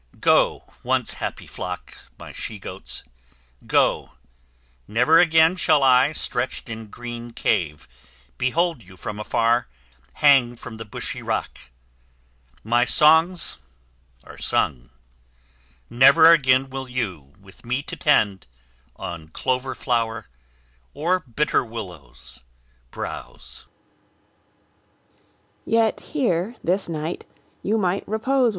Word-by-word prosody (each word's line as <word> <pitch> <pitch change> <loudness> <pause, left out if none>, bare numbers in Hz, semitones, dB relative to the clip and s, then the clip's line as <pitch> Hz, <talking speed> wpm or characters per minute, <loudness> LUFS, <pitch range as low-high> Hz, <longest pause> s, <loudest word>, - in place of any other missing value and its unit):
Go, - - +3 0.2
once - - +1
happy - - -4
flock, - - -8
My - - -10
she 110 - -5
goats, 95 -1 -3 0.6
go. - - +1 0.7
Never 125 +9 +4
again 165 0 +5
shall 155 -5 +3
I, 130 +2 +5
Stretched 125 -5 -2
in 110 0 -7
green 120 +1 -8
cave, 75 -9 -1 0.5
behold 165 +2 0
you 95 -2 -16
from 105 +2 -6
afar 115 +2 +1 0.5
Hang 135 -5 +4
from 115 -1 -10
the 115 - -7
bushy 105 - -5
rock; - - -3 1.1
my 120 +2 +2
songs 160 +6 +4 0.6
are - - -13
sung; 60 -1 0 1.0
Never 140 +7 +7
again 135 -4 +3
will 135 0 -5
you, 95 - -4
with 95 -1 -17
me 125 +4 -2
to - - -7
tend, 105 - +1 0.5
On 85 -3 -7
clover 130 +8 -2
flower, 115 -3 -2 0.7
or 175 +5 +1
bitter 145 0 0
willows, 85 - -10 0.5
browse. - - -8
120 Hz, 90 wpm, -23 LUFS, 105-140 Hz, 1.1 s, Never